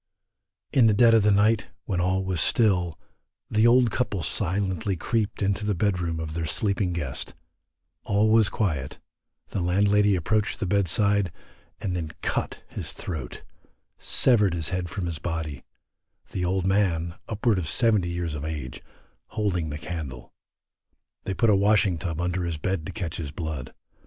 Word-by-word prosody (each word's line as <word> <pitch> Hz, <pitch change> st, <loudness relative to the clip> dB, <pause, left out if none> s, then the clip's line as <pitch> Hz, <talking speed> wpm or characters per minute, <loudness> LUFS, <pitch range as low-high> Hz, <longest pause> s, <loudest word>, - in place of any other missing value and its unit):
In 125 Hz, -4 st, +6 dB
the 105 Hz, -, +4 dB
dead 115 Hz, +1 st, +6 dB
of 115 Hz, -, +6 dB
the 105 Hz, -, +3 dB
night, 105 Hz, +1 st, +3 dB, 0.2 s
when 90 Hz, -4 st, -1 dB
all 95 Hz, +1 st, +1 dB
was 90 Hz, -4 st, 0 dB
still, 90 Hz, -5 st, +2 dB, 0.5 s
the 110 Hz, +2 st, +4 dB
old 120 Hz, -1 st, +5 dB
couple 105 Hz, -7 st, -1 dB
silently 95 Hz, +1 st, 0 dB
creaped 105 Hz, +3 st, -1 dB
into 100 Hz, +2 st, 0 dB
the 105 Hz, -1 st, 0 dB
bed 95 Hz, +1 st, +1 dB
room 85 Hz, -2 st, -2 dB
of 80 Hz, -1 st, -4 dB
their 80 Hz, -1 st, -2 dB
sleeping 100 Hz, 0 st, 0 dB
guest, 80 Hz, -5 st, -4 dB, 0.7 s
all 105 Hz, 0 st, +2 dB
was 110 Hz, -2 st, +5 dB
quiet: 75 Hz, -, -2 dB, 0.5 s
the -, -, -3 dB
landlady 100 Hz, +3 st, +3 dB
approached 105 Hz, +6 st, 0 dB
the 110 Hz, -, -1 dB
bedside, 100 Hz, 0 st, +2 dB, 0.5 s
and 95 Hz, -2 st, -2 dB
then 80 Hz, -3 st, -4 dB
cut -, -, -2 dB
his -, -, -6 dB
throat, 75 Hz, -10 st, -6 dB, 0.6 s
severed 105 Hz, -8 st, +3 dB
his 80 Hz, -2 st, -3 dB
head 90 Hz, -2 st, -2 dB
from 90 Hz, +4 st, -4 dB
his 85 Hz, -3 st, -4 dB
body; 80 Hz, -5 st, -4 dB, 0.7 s
the 90 Hz, -, -2 dB
old 95 Hz, +1 st, 0 dB
man, 90 Hz, -4 st, +1 dB, 0.2 s
upwards 110 Hz, -2 st, +1 dB
of 80 Hz, -, -3 dB
seventy 105 Hz, -3 st, +2 dB
years 85 Hz, -2 st, -3 dB
of 75 Hz, -1 st, -5 dB
age, 75 Hz, -5 st, -5 dB, 0.5 s
holding 90 Hz, -7 st, -1 dB
the 75 Hz, -, -4 dB
candle. 75 Hz, -7 st, -7 dB, 0.9 s
They 95 Hz, -, -2 dB
put 115 Hz, -3 st, +3 dB
a -, -, +5 dB
washing 100 Hz, -3 st, +3 dB
tub 80 Hz, -3 st, -3 dB
under 90 Hz, 0 st, -1 dB
the 80 Hz, -, -3 dB
bed 85 Hz, 0 st, -2 dB
to -, -, -5 dB
catch 90 Hz, -7 st, -4 dB
his 75 Hz, -4 st, -5 dB
blood. 80 Hz, -4 st, -5 dB
95 Hz, 165 wpm, -26 LUFS, 85-105 Hz, 0.9 s, In